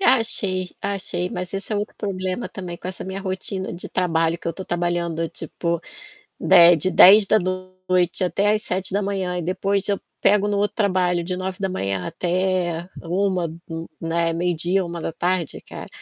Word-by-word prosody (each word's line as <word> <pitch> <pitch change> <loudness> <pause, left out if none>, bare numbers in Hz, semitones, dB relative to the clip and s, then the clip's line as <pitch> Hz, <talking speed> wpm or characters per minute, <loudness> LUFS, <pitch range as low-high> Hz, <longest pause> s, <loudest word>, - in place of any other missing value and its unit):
Achei, 200 - +2
achei, 195 -3 -2
mas 180 0 -5
esse 195 +2 -2
é - - +1
o - - +1
outro 205 - -4
problema 190 +1 -3
também 180 -3 -7
com 180 - -7
essa 185 - -6
minha 190 +1 -5
rotina 190 0 -4
de 175 - -6
trabalho, 165 -2 +1
que - - -10
eu - - +1
estou 185 +3 -7
trabalhando 175 -1 -1
tipo, 170 +1 -3 0.6
de 170 0 +7
de 175 +4 0
22h 200 +3 +8
da 215 - +4
noite 185 -1 -1
até 200 +3 +2
às 215 0 0
7h 185 -2 -2
da 200 +1 +1
manhã 190 -3 -2
e - - -2
depois 195 +3 0
eu 200 -1 +1 0.2
pego 205 0 +4
no 205 -1 0
outro 205 +1 0
trabalho 185 -4 +1
de 180 +2 -2
9h 185 0 -4
da 195 - 0
manhã 100 - -2
até 180 -1 -1
13h, 185 0 0 0.2
n 165 0 -5
né, 165 0 0
meio-dia, 175 +2 0
13h, 170 0 -5
da 165 - -3
tarde 175 -1 -1
cara. - - -8
185 Hz, 185 wpm, -22 LUFS, 175-195 Hz, 0.6 s, 22h